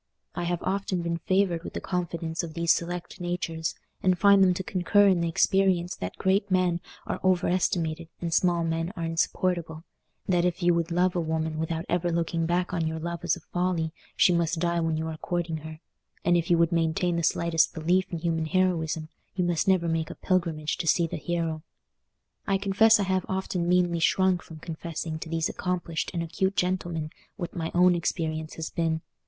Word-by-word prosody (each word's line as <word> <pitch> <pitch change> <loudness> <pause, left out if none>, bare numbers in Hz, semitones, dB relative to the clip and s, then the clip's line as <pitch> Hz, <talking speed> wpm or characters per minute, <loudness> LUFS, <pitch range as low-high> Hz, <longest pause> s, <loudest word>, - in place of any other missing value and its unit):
I 175 - -3
have 175 0 -2
often 190 -2 -1
been 170 0 -2
favoured 185 -2 +1
with - - -7
the - - -1
confidence 170 -2 -3
of 165 -2 -7
these 170 -1 +4
select 175 +1 -5
natures, 175 -2 -2 0.3
and 185 -1 +3
find 200 +1 +6
them 185 -1 +4
to 190 - -3
concur 200 +3 +3
in 185 -3 +3
the 170 - 0
experience 185 0 +2
that 90 - -5
great 195 +1 +1
men 180 -2 +2 0.2
are - - -3
overestimated 175 -3 +1
and 170 -1 -3
small 175 -1 +3
men 165 +1 -1
are 170 - -4
insupportable; 165 0 -1 0.4
that 175 -2 +2
if 180 0 -1
you 175 0 +5
would 170 -1 0
love 180 +1 +2
a - - +1
woman 160 -1 -2
without 160 +1 -2
ever 175 0 0
looking 165 0 0
back 180 +1 0
on 165 -3 0
your 160 0 -3
love 170 +1 -4
as 170 -2 +2
a 170 - -12
folly, 175 -3 0 0.2
she 180 - +5
must 170 0 +1
die 170 +1 +1
while 165 -1 0
you 160 +1 -2
are 160 -1 -5
courting 175 -1 -2
her; 155 +1 -9 0.4
and 175 - +4
if 170 -1 0
you 170 - +5
would 170 +1 +3
maintain 170 +1 +1
the 170 - 0
slightest 165 0 +2
belief 180 +4 +1
in 170 - -2
human 165 -1 -1
heroism, 165 -3 0 0.3
you 185 - +1
must 175 -1 0
never 185 -3 +3
make 165 -1 -1
a - - -7
pilgrimage 165 -5 -1
to 170 - -3
see 170 +1 +4
the 165 - -4
hero. 165 -1 -2 0.9
I 195 - +3
confess 205 +3 +4
I - - +2
have 185 -1 0
often 185 -2 -1
meanly 175 -1 +3
shrunk 185 +1 +3
from 160 - -11
confessing 160 0 -5
to 160 - -7
these 165 0 0
accomplished 175 -3 -2
and 170 -2 -2
acute 190 +4 -1
gentlemen 175 -4 -1 0.3
what 175 -5 -5
my 165 -2 -2
own 180 0 +6
experience 160 -2 -2
has 160 -1 -5
been. 160 -1 0
170 Hz, 200 wpm, -27 LUFS, 165-180 Hz, 0.9 s, find